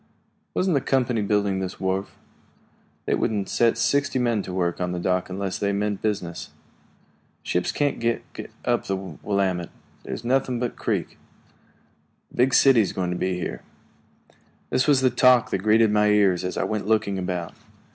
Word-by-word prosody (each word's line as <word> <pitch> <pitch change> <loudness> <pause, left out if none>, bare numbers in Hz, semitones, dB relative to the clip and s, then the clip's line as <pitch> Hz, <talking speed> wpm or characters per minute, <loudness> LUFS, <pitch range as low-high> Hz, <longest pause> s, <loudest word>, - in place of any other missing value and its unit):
"Wasn't 185 -1 +1
the 140 - +2
company 125 -4 +1
building 100 -1 +1
this 95 -1 -5
wharf?" 95 +1 -2 0.9
"They - - 0
wouldn't 105 -3 0
set 115 -1 +2
sixty 140 +4 +1
men 120 -4 +1
to 95 - -7
work 90 -1 -1
on 90 0 -1
the 90 - -3
dock 90 +1 0
unless 95 0 -3
they 100 0 0
meant 105 0 -1
business." 95 -6 -3 0.9
"Ships 90 0 -1
can't 145 -1 -1
get 115 0 -3 0.2
up - - +1
the 95 - -1
Willamette 95 0 -2 0.3
that's - - -6
nothing 125 0 0
but 125 -1 -1
a - - -23
creek. - - -3 1.1
The - - -15
big 125 +1 +3
city 135 -4 +6
is 100 - -1
going 90 -2 -2
to - - -2
be 95 +1 -1
here." 90 - -4 1.1
This 130 - +2
was 140 -3 +4
the 130 -1 +3
talk 125 0 +4
that - - 0
greeted 110 +2 +4
my 105 0 +3
ears 100 -4 +3
as 90 - -3
I - - 0
went 105 -2 -3
looking 105 -3 +1
about. 90 -2 -3
105 Hz, 175 wpm, -24 LUFS, 95-120 Hz, 1.1 s, city